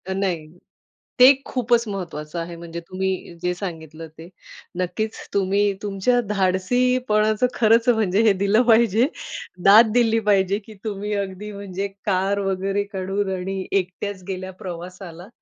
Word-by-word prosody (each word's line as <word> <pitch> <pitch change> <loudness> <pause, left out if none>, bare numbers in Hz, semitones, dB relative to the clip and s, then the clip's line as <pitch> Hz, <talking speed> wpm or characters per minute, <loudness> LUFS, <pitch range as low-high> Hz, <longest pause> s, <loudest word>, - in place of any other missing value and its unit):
नाही, 180 -5 -2 0.7
ते 255 +2 +9
खूपच 240 -2 +1
महत्वाचं 170 -5 -5
आहे. 170 +1 -5
म्हणजे 170 0 -7
तुम्ही 185 -2 -3
जे 180 0 0
सांगितलं 165 -4 -7
ते, 165 +2 -11 0.5
नक्कीच. 215 +5 -2 0.2
तुम्ही 200 +1 +2
तुमच्या 205 +5 +1
धाडसीपणाचं 215 +3 +1
खरंच 230 +1 +3
म्हणजे 215 -4 +2
हे 210 - +6
दिलं 200 +4 +2
पाहिजे. 230 +1 +4 0.6
दाद 215 +3 +8
दिली 225 -2 +3
पाहिजे, 195 0 +3
की 215 +1 -14
तुम्ही 210 -1 -3
अगदी 200 +1 -4
म्हणजे 200 -1 -5 0.2
कार 195 0 +1
वगैरे 195 +1 -1
काढून 195 +1 -2
आणि 190 +1 -4
एकट्याच 190 0 -2
गेल्या 185 -1 -5
प्रवासाला. 180 0 -8
195 Hz, 130 wpm, -22 LUFS, 185-215 Hz, 0.7 s, ते